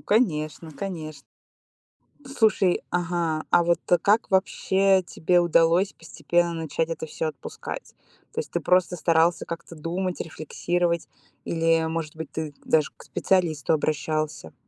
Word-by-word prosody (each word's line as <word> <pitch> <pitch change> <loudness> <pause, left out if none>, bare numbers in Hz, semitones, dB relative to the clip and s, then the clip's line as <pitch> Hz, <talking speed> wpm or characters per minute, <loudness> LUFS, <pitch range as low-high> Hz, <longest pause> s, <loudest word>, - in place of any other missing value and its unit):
конечно, 160 -7 0
конеч 155 -6 -6 1.0
Слушай, 220 -8 +2
ага, 170 -3 -1
а 175 - +5
вот, 170 0 +2
э, 175 - +7
как 210 +5 +2
вообще 190 0 +3
тебе 175 0 +1
удалось 170 +3 +3
постепенно 170 +2 -1
начать 160 0 -2
это 160 -1 -4
всё 160 - -3
отпускать? 135 -4 -8 0.4
То - - -4
есть - - -5
ты - - 0
просто 180 0 +2
старался 165 +1 +2
как-то 170 0 -7
думать, 175 +4 -3
рефлексировать? 170 +2 -2 0.4
Или, 165 0 +2
может 160 -1 -4
быть, 160 - -7
ты 155 -2 -4
даже 155 -2 +2
к - - -15
специалисту 165 -5 +1
обращался? 155 - -1
165 Hz, 130 wpm, -25 LUFS, 160-180 Hz, 1.0 s, э